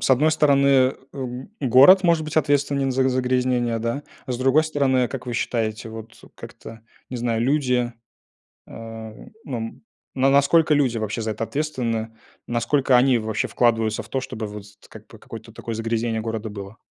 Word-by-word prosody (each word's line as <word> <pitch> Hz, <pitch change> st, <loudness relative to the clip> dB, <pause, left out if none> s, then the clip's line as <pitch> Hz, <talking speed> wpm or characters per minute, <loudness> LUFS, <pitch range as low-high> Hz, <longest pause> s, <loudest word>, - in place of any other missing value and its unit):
с -, -, -1 dB
одной 145 Hz, +5 st, +4 dB
стороны, 140 Hz, -4 st, +3 dB, 0.2 s
эм, 130 Hz, +1 st, -6 dB
город 140 Hz, +9 st, +6 dB
может 170 Hz, -2 st, +3 dB
быть 155 Hz, 0 st, -7 dB
ответственен 140 Hz, -2 st, +1 dB
за 130 Hz, +1 st, +2 dB
загрязнение, 125 Hz, -2 st, 0 dB
да. 115 Hz, +5 st, -2 dB, 0.2 s
А 130 Hz, -, -3 dB
с 120 Hz, -, -4 dB
другой 135 Hz, +4 st, +3 dB
стороны, 135 Hz, -5 st, +1 dB
как 130 Hz, -2 st, -7 dB
вы 125 Hz, -, -4 dB
считаете, 110 Hz, -2 st, -2 dB
вот, 110 Hz, 0 st, -10 dB, 0.2 s
как-то, 115 Hz, 0 st, -11 dB, 0.3 s
не 130 Hz, -, -4 dB
знаю, 115 Hz, -1 st, -1 dB
люди, 125 Hz, -3 st, +1 dB, 0.8 s
э, -, -, -16 dB, 0.7 s
ну, 130 Hz, -4 st, -4 dB
м, 115 Hz, 0 st, -7 dB, 0.3 s
ну 135 Hz, +1 st, +3 dB
насколько 150 Hz, +3 st, +4 dB
люди 130 Hz, -5 st, +1 dB
вообще 110 Hz, +1 st, -3 dB
за 110 Hz, -, -2 dB
это 110 Hz, +2 st, -3 dB
ответственны, 115 Hz, -4 st, -3 dB, 0.3 s
насколько 125 Hz, +3 st, +1 dB
они 125 Hz, 0 st, +4 dB
вообще 110 Hz, -1 st, -2 dB
вкладываются 115 Hz, -2 st, +1 dB
в 110 Hz, -, -17 dB
то, 135 Hz, -, -2 dB
чтобы, 120 Hz, -4 st, -6 dB
вот, 105 Hz, -1 st, -8 dB, 0.2 s
как -, -, -14 dB
бы -, -, -14 dB
какое-то -, -, -11 dB
такое 115 Hz, -, -6 dB
загрязнение 115 Hz, 0 st, -2 dB
города 110 Hz, 0 st, -4 dB
было? 100 Hz, +1 st, -9 dB
125 Hz, 170 wpm, -22 LUFS, 115-140 Hz, 0.8 s, город